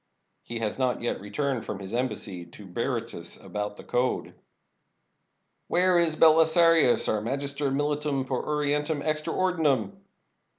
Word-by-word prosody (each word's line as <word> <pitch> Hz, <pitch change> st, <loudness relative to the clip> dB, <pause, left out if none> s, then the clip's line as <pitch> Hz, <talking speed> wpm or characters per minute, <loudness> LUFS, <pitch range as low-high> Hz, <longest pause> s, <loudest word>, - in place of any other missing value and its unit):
" -, -, -50 dB
"He 120 Hz, -, -6 dB
has 115 Hz, +2 st, -3 dB
not 125 Hz, -2 st, 0 dB
yet 120 Hz, -, -2 dB
returned 120 Hz, +5 st, -2 dB
from 105 Hz, -, -5 dB
his 100 Hz, +1 st, -8 dB
embassy 105 Hz, -7 st, -3 dB
to 95 Hz, +4 st, -14 dB
Bery 115 Hz, +5 st, -2 dB
tus 85 Hz, -6 st, -7 dB
about 105 Hz, 0 st, -5 dB
the -, -, -12 dB
code." 125 Hz, +1 st, -1 dB, 1.3 s
"Where 180 Hz, 0 st, +3 dB
is 165 Hz, -2 st, +3 dB
Belisarius, 160 Hz, -2 st, +5 dB
our 105 Hz, -, 0 dB
Magister 140 Hz, +4 st, -2 dB
Militum 145 Hz, 0 st, -1 dB
per 130 Hz, -1 st, -2 dB
Orien 150 Hz, -1 st, 0 dB
tum 150 Hz, -1 st, -3 dB
extra 155 Hz, +1 st, -1 dB
Ordinem?" 155 Hz, -, +1 dB
135 Hz, 145 wpm, -26 LUFS, 110-155 Hz, 1.3 s, Belisarius